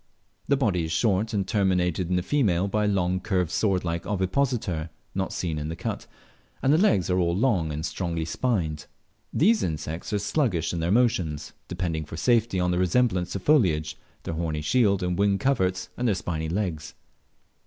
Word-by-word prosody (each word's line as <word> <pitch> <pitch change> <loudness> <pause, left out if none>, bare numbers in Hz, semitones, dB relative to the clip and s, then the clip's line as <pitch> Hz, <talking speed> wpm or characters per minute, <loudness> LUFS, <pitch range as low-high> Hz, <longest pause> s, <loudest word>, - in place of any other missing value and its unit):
The 140 - +3
body 100 - +1
is 80 - -5
short, 105 +4 +1
and 100 -4 -1
terminated 90 -3 +1
in 90 - +1
the 90 - 0
female 100 -8 +1
by 105 +2 0
a - - +2
long 95 -2 +1
curved 90 -4 -1
sword 95 -4 +1
like 85 0 -2
ovipositor 95 - -1 0.2
(not 95 0 -2
seen 80 -4 -2
in 75 +1 -4
the 80 - -4
cut), - - -5 0.6
and 135 - +4
the 155 - +4
legs 105 - +3
are 90 - +2
all 85 -1 +1
long 100 -10 +1
and 75 +2 -3
strongly 85 0 -2
spined. 80 -7 -1 0.4
These 215 +8 +3
insects 80 +1 -4
are 105 - +1
sluggish 100 - 0
in 85 - -2
their 80 +1 -1
motions, 90 -10 +1
depending 85 -3 -3
for 80 - -8
safety 115 -2 +2
on 90 0 +1
their 90 - 0
resemblance 90 -1 +1
to 100 - -2
foliage, 90 - +2 0.3
their - - -4
horny 80 -2 -2
shield 100 +2 +2
and 90 +1 -1
wing 100 -1 +3
coverts, 95 -8 0
and 125 - -1
their 105 - +2
spiny 80 -2 -3
legs. 85 -4 -3
90 Hz, 185 wpm, -26 LUFS, 85-105 Hz, 0.6 s, and